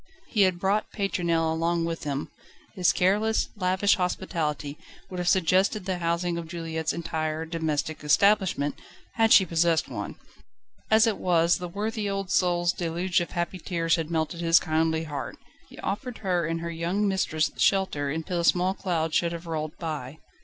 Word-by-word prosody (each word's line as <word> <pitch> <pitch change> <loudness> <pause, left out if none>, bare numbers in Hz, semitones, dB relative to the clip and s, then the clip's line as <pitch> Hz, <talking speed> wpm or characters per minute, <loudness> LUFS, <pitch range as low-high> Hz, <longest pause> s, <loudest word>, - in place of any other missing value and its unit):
He 215 - +1
had 185 -2 +4
brought 200 +3 0
Pétronelle 170 -5 0
along 165 +1 0
with 165 -2 -4
him: 140 0 -3 0.4
his 180 -6 +3
careless, 210 +6 +1
lavish 190 +1 +2
hospitality 160 -6 -2 0.4
would 180 - -5
have 175 - -2
suggested 190 +3 +2
the 185 -2 -2
housing 170 0 -1
of 165 - -7
Juliette's 160 -1 -3
entire 160 -1 -3
domestic 160 -2 -2
establishment, 185 -2 +3 0.4
had 225 -1 +2
she 190 - +8
possessed 165 -1 +1
one. - - -5 0.7
As 220 +1 +6
it 220 -3 0
was, 170 -1 +3
the 180 -1 -5
worthy 210 +2 -3
old 195 -1 -3
soul's 175 -1 +2
deluge 175 +2 0
of 175 - -4
happy 175 +1 -2
tears 165 -1 0
had 165 -2 -3
melted 165 +1 -2
his 165 0 +5
kindly 160 0 +1
heart. 145 -3 -5 0.3
He - - -14
offered 245 +4 -3
her 180 -5 0
and 165 0 -2
her 170 0 -4
young 175 +5 -1
mistress 175 -5 0
shelter, 190 -8 +1
until 160 +4 -2
the - - 0
small 180 +2 +3
cloud 165 -5 -2
should 170 +1 +1
have 170 +1 -7
rolled 155 -2 -4
by. 155 -4 -5
170 Hz, 165 wpm, -26 LUFS, 160-190 Hz, 0.7 s, she